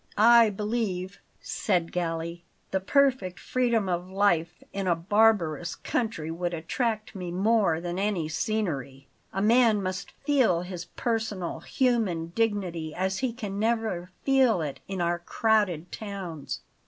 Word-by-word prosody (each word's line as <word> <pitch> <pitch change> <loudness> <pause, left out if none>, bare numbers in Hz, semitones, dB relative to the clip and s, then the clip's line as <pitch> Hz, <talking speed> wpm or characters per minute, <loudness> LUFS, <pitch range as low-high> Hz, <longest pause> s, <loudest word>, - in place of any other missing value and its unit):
"I 230 +1 +7
believe," 200 -3 -2 0.2
said 175 -5 -1
Galli, 170 0 -3 0.3
"the 190 - +1
perfect 250 -4 +2
freedom 235 -5 +1
of 180 0 -2
life 175 -4 +1
in 195 -1 -2
a 175 - +3
barbarous 175 -3 +2
country 215 -10 -2
would 175 +1 -2
attract 215 +6 -2
me 180 -3 -5
more 195 -2 +2
than 175 +1 -4
any 195 -6 0
scenery. 150 - -2 0.3
A 195 - -1
man 230 -1 +5
must 185 +1 -3 0.2
feel 255 - +3
his 180 -1 -6
personal, 220 -6 -2
human 220 - 0
dignity 185 -8 -1
as 190 +1 -1
he 260 -2 0
can 210 -4 -5
never 220 -5 0
feel 265 -7 +4
it 145 -2 -5
in 190 -2 -3
our 170 0 +1
crowded 185 -3 +1
towns." 190 -8 -6
190 Hz, 135 wpm, -27 LUFS, 175-225 Hz, 0.3 s, I